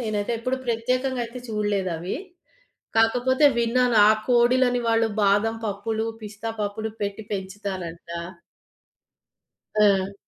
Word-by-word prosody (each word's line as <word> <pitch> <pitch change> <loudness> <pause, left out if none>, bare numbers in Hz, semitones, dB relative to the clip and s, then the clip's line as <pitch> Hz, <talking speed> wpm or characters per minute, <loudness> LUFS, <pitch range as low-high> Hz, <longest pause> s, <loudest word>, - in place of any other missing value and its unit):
నేనైతే 215 -1 -2
ఎప్పుడు 255 +3 -1
ప్రత్యేకంగా 250 +2 0
అయితే 235 +2 -8
చూడలేదవి. 195 -5 -2 0.8
కాకపోతే 245 +5 +3
విన్నాను 235 0 +2
ఆ - - +7 0.2
కోడిలని 245 +1 +4
వాళ్ళు 225 0 +3
బాదం 205 +3 +3
పప్పులు, 220 +2 -2 0.2
పిస్తా 215 +2 -5
పప్పులు 210 +2 -3
పెట్టి 205 +1 -3
పెంచుతారంట. 190 -4 -5 1.7
ఆ! 200 -1 +3
220 Hz, 100 wpm, -24 LUFS, 200-240 Hz, 1.7 s, ఆ